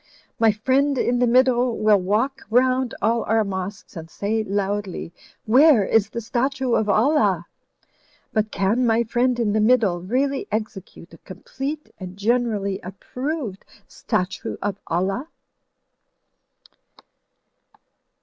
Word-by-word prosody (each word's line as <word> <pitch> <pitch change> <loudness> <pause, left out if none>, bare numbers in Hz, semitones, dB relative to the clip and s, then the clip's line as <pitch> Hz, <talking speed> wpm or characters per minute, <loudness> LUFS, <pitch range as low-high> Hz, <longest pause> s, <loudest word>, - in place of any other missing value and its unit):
My 225 -1 +5
friend 265 +6 +1
in 245 0 +1
the 245 - +3
middle 250 -1 +3
will 215 -1 +4
walk 230 +9 -1
rotmd 255 +1 +2
all 230 +2 +2
our 225 +1 +2
mosques 195 0 -6
and 165 -1 -8
say 215 +4 -2
loudly, 200 -3 -3 0.3
'Where 255 -1 +5
is 215 0 +2
the 235 - -5
statue 260 +2 -1
of 215 -2 +1
Allah?' 210 - +2 0.9
But 215 -1 0
can 215 +6 0
my 225 +1 +3
friend 245 +2 0
in 215 -3 +1
the 215 - +2
middle 215 -6 +3
really 265 +8 -1
execute 205 -5 -6
a - - -14
complete 270 - -7
and 185 -1 -8
generally 210 -3 0
approved 245 - -5 0.2
statue 180 +1 -3
of 205 -1 -3
Allah?" 195 - -1
220 Hz, 120 wpm, -22 LUFS, 200-255 Hz, 0.9 s, My